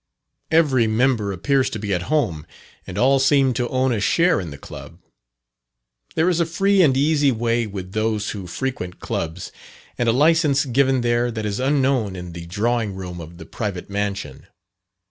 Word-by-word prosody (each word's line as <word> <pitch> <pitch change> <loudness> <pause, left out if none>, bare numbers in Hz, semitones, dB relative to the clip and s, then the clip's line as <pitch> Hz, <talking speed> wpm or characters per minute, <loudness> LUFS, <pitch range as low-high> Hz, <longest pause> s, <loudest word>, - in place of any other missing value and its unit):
Every 140 -8 +3
member 110 -2 +1
appears 130 +9 +1
to - - -5
be 100 -1 -3
at 90 - 0
home, 115 - 0 0.4
and 95 - -7
all 135 +5 +4
seem 135 -1 +3
to 120 -1 -2
own 130 -1 +1
a 110 - -1
share 170 - +3
in 85 - -6
the 70 - -9
Club. - - -11 1.2
There 160 - +2
is 175 -2 +2
a 170 - +3
free 195 +4 +2
and 135 -6 +4
easy 145 0 +3
way 115 0 0
with 95 -2 -7
those 110 0 -1
who 100 -4 -7
frequent 90 -3 -4
Clubs, 85 +3 -4 0.5
and 120 -1 +2
a - - +5
licence 150 +1 +3
given 130 0 +2
there 120 0 +1
that 110 -2 -4
is 105 +1 -2
unknown 130 -6 +1
in 90 -1 -8
the 85 0 -8
drawing 110 +2 -1
room 90 -2 -7
of 85 +1 -11
the 80 - -10
private 100 0 -5
mansion. 100 -9 -4
120 Hz, 180 wpm, -21 LUFS, 100-135 Hz, 1.2 s, a